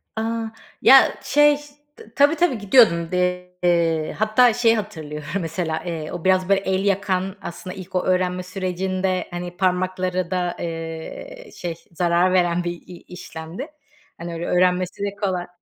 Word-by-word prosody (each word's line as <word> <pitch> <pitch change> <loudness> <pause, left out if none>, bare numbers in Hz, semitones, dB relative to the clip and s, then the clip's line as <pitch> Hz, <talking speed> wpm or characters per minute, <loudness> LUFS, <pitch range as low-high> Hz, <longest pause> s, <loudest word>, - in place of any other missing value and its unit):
Aaa, 225 0 -2 0.3
ya, - - +7
şey, 295 0 +4 0.4
t 220 - -16
tabii, 290 +3 +5
tabii 345 -9 +1
gidiyordum. 190 -6 +4
De 180 0 0
eee, 165 -3 +1
hatta 220 +2 +4
şeyi 230 -1 +3
hatırlıyorum 155 -8 -6
mesela. 165 -1 -3 0.3
O 175 -2 -6
biraz, 185 0 +3
böyle, 195 - +4
el 190 0 -1
yakan, 195 -1 0
aslında 185 +1 -7
ilk 185 -1 -10
o 180 - +1
öğrenme 185 0 0
sürecinde, 185 0 -2
hani, 175 0 -6
parmaklara 185 -1 0
da, 180 -1 -1
eee, 165 - -7
şey, 175 -2 -4 0.2
zarar 175 +2 +2
veren 175 -1 +2
bir 175 - -2 0.2
i 180 - -10
işlemdi. 175 - -8 0.5
Hani, 170 0 -6
öyle 165 +1 -4
öğrenmesi 180 +1 +1
de 200 0 -3
kola 185 -3 -2
185 Hz, 145 wpm, -22 LUFS, 175-200 Hz, 0.5 s, ya